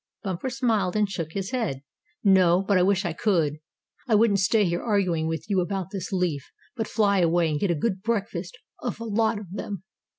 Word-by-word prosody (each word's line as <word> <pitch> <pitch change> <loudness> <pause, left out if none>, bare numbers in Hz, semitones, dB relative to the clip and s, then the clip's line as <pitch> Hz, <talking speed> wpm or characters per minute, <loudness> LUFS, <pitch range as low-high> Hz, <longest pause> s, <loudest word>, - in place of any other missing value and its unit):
Bumper 190 +5 -3
smiled, 225 -8 0
and 210 -1 +2
shook 165 -5 -5
his 195 +1 -3
head. 215 - -2 0.4
"No, 190 -2 +5
but 200 0 +1
I - - +4
wish 190 +1 +2
I 170 - -1
could. 165 -6 +1 0.5
I 225 - +3
wouldn't 210 -2 +4
stay 205 +3 +3
here 175 0 -1
arguing 185 -8 +1
with 160 +4 -3
you 195 -3 +2
about 190 0 -3
this 195 -1 -5
leaf 175 -7 -1 0.2
but 225 -3 -2
fly 200 -3 +2
away 170 -1 +2
and 150 - -1
get 200 - 0
a 170 - +2
good 190 +4 -1
breakfast 230 - -3 0.2
of - - -4
a - - -5
lot 220 0 +1
of 200 -4 -9
them." 200 -1 -5
195 Hz, 205 wpm, -25 LUFS, 175-210 Hz, 0.5 s, No